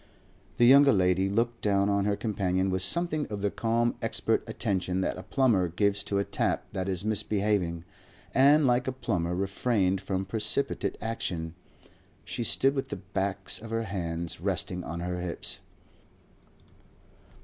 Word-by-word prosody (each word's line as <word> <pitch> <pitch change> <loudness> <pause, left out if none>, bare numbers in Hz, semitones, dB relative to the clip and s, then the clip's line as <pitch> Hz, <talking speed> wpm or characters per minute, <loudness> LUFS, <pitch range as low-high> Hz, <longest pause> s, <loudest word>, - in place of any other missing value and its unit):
The 120 - +5
younger 140 +2 +8
lady 95 0 +2
looked 115 +3 0
down 100 -1 +2
on 100 -1 +1
her 105 0 +1
companion 95 -3 0
with 95 0 0
something 155 - +1
of 105 -2 -5
the 100 0 0
calm 115 +1 +1
expert - - 0
attention 95 -1 -1
that - - -1
a - - -6
plumber 115 -10 +2
gives 100 +4 0
to 100 - -1
a 100 - +2
tap - - -1
that 95 -1 -2
is 95 +1 -3
misbehaving, 100 -5 0 0.5
and 145 +3 +5
like 125 0 +2
a - - +1
plumber 90 -9 -1
refrained 95 0 0
from 95 0 -2
precipitate 110 +7 -1
action. 85 -8 -3 0.7
She 120 - -3
stood 135 +4 +2
with 135 -1 -2
the - - -4
backs 95 +1 -3
of 115 - -9
her 115 0 -1
hands 85 -5 -4
resting 90 -1 -2
on 85 +1 -5
her 90 0 -3
hips. 90 -1 -4
100 Hz, 155 wpm, -28 LUFS, 95-115 Hz, 0.7 s, younger